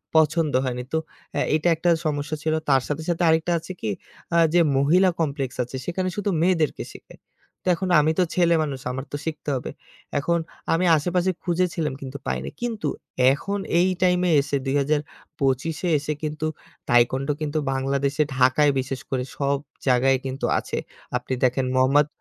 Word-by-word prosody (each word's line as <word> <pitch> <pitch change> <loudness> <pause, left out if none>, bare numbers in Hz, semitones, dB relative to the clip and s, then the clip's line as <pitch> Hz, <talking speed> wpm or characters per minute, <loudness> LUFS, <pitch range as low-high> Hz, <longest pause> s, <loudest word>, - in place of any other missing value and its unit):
পছন্দ 155 0 +3
হয়নি। 125 -1 -3
তো - - +3 0.4
অ্যা - - 0
এটা 155 +2 +1
একটা 175 +2 0 0.2
সমস্যা 145 0 -1
ছিল। 155 0 +1 0.2
তার 135 -2 +5
সাথে, 150 +2 -2
সাথে 175 +1 0
আরেকটা 160 +2 +2
আছে 175 - -9
কি 110 - -2 0.5
আ - - +5 0.2
যে 175 - +5 0.2
মহিলা 175 +7 +4
কমপ্লেক্স 140 -5 -2
আছে, 125 +2 -9
সেখানে 185 +1 -1
শুধু 205 -1 -1
মেয়েদেরকে 165 -4 +1
শিখায়। - - -15 0.4
তো - - -9
এখন 185 +2 -3
আমি 155 +1 +3
তো 185 - +6
ছেলেমানুষ। 160 -6 +2
আমার 130 +2 -5
তো 145 - -2
শিখতে 155 -2 -4
হবে। 125 - -4 0.5
এখন 170 +4 +1 0.3
আমি 175 +3 +2
আশেপাশে 180 +4 +1
খুঁজেছিলাম 170 -4 0
কিন্তু 135 +1 -6
পাইনি। - - -2
কিন্তু 235 -3 -2 0.5
এখন 200 +8 -3 0.2
এই 185 - +4
টাইমে 180 0 +3 0.4
২০২৫ 145 +1 -1
এ - - +2
এসে 150 +1 -2
কিন্তু 155 +1 -3 0.4
Taekwondo 130 +4 +3
কিন্তু 155 0 -2 0.2
বাংলাদেশে 140 +2 0
ঢাকায় 130 +3 +4
বিশেষ 130 0 -3
করে 130 -2 -1
সব 140 0 +1 0.3
জায়গায় 130 +1 +4
কিন্তু 135 0 -3
আছে। - - -5 0.4
আপনি 125 +1 -5
দেখেন 130 +1 +2
মোহাম্মদ 135 +3 +4
150 Hz, 160 wpm, -24 LUFS, 135-170 Hz, 0.5 s, তো